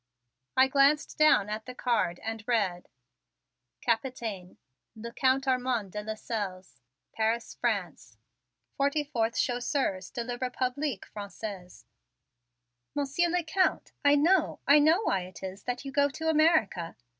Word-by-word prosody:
I 260 +1 +7
glanced 280 +3 +3
down 305 -10 +5
at 215 +2 -5
the 255 - -7
card 230 -9 0
and 225 0 -4
read: 200 -7 0 0.9
Capitaine, 225 -6 -2 0.4
le 235 +2 -8
Count 265 0 +2
Armond 250 -6 0
de 210 - -4
Lasselles, 205 - -5 0.3
Paris, 225 +1 -1
France. - - -3 0.6
44th 280 -5 0
Chasseurs 245 -6 -1
de 235 - -4
le 245 0 -5
Republique 255 -1 -2
Francaise. 200 -3 -8 1.1
"Monsieur 290 +5 +1
le 355 0 0
Count, 365 +4 0
I 285 0 +6
know, 330 +4 +3
I 285 +2 +7
know 320 +8 +4
why 195 - +1
it 185 +1 -10
is 190 +1 -7
that 245 +2 -3
you 275 - -5
go 285 +1 +3
to 320 +3 -3
America!" 310 - +2
245 Hz, 130 wpm, -29 LUFS, 210-285 Hz, 1.1 s, I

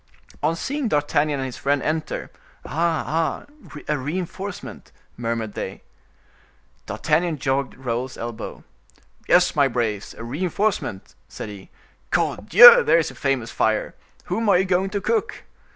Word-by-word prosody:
On 165 - +1
seeing 275 - -2
D'Artagnan 145 -3 +1
and 135 - -3
his 130 - -6
friend 145 +1 +1
enter:—"Ah! 155 0 -5
ah! 165 0 0 0.4
a 150 -2 0
reinforcement," 180 +7 -6 0.2
murmured 115 -2 -3
they. - - -6 1.0
D'Artagnan 170 -2 0
jogged 135 -1 -1
Raoul's 125 0 -4
elbow. 115 -1 -7 0.7
"Yes, - - +4
my 140 -2 +4
braves, 115 -5 -2
a - - -9
reinforcement," 170 - -2 0.2
said - - -7
he; 100 -2 -11 0.4
"cordieu! 485 0 +7
there - - +4
is 165 - 0
a - - -13
famous 135 -5 -1
fire. 110 -1 0 0.3
Whom 225 -1 -1
are 195 - +6
you 190 - +2
going 190 +1 +1
to 200 0 -3
cook?" 440 - -1
150 Hz, 135 wpm, -23 LUFS, 120-180 Hz, 1.0 s, cordieu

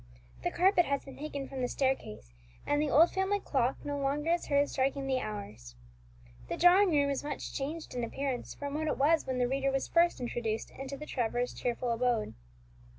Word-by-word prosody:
The - - 0
carpet 360 -1 +4
has 280 -1 -1
been 270 - -10
taken 285 -2 -5
from 265 -1 -5
the 250 - +1
staircase, 245 - -2 0.3
and 290 0 +1
the 300 - 0
old 330 +5 +6
family 385 +1 0
clock 265 -7 0
no 285 -1 -2
longer 290 +4 0
is 345 - 0
heard 285 0 +3
striking 275 +1 -1
the 265 -1 +1
hours. 200 - -7 0.7
The - - -2
drawing 370 +3 +6
room 285 -3 +2
is 275 - -2
much 295 - -5
changed 305 +4 -4
in 245 -1 -2
appearance 265 +2 -3
from 285 -1 -5
what 310 +1 -1
it - - 0
was 310 +4 +3
when 260 -1 -1
the 250 -1 +2
reader 275 +1 0
was 270 0 -1
first 340 +1 +3
introduced 235 -3 -3
into 270 +1 -7
the 300 - -7
Trevors' 245 -2 -1
cheerful 245 0 -2
abode. 235 -2 0
275 Hz, 200 wpm, -31 LUFS, 250-300 Hz, 0.7 s, old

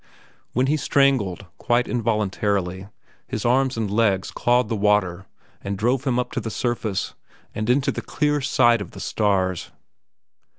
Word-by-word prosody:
When 125 +2 +2
he 150 +3 +1
strangled, 130 - +1
quite 120 +1 +1
involuntarily 100 -5 -1 0.4
his 110 - -4
arms 130 +1 +2
and 110 -3 -2
legs 105 -3 +1
clawed 120 -1 +2
the 115 - -2
water 100 -3 +1 0.3
and 100 0 -4
drove 125 +6 0
him 125 -3 +1
up 125 - -1
to - - -2
the 115 - -4
surface 110 -4 -2 0.4
and 110 +2 -3
into 130 +2 +2
the - - -5
clear 150 -1 0
sight 120 -4 +3
of 100 - -8
the - - -9
stars. 95 -4 0
110 Hz, 155 wpm, -23 LUFS, 100-125 Hz, 0.4 s, sight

